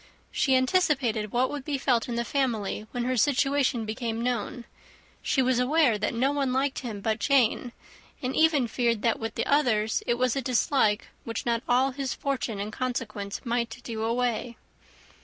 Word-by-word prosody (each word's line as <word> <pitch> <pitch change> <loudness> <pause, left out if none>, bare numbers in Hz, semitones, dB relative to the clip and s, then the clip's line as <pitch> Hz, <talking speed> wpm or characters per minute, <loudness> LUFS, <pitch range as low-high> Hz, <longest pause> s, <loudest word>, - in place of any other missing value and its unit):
She 265 -2 +2
anticipated 260 - +1
what 250 +2 +1
would 290 -2 -5
be 285 0 -2
felt 250 -3 +1
in 235 - -2
the 235 0 -1
family 225 -6 -1
when 245 -1 -3
her 255 +1 0
situation 275 -1 +2
became 225 +1 -3
known: 245 +1 -2 0.6
she 265 - +1
was 255 -1 +2
aware 255 -3 +3
that - - -1
no 260 +4 +2
one 280 -3 0
liked 265 +1 0
him 220 -6 -6
but 220 +1 -1
Jane; 250 -2 +2 0.5
and 255 -2 -3
even 310 -6 +3
feared 230 -1 0
that 230 - +2
with 225 0 -4
the - - -1
others 225 -7 +2
it 240 - +2
was 250 0 +1
a 275 - 0
dislike 240 -3 +1
which 230 - -4
not 235 -1 +1
all 255 +2 +3
his 270 -1 -3
fortune 255 -6 -2
and 210 +2 -4
consequence 220 -6 -4
might 235 -1 -1
do 225 -2 -5
away. 235 +1 -1
245 Hz, 175 wpm, -27 LUFS, 225-270 Hz, 0.6 s, aware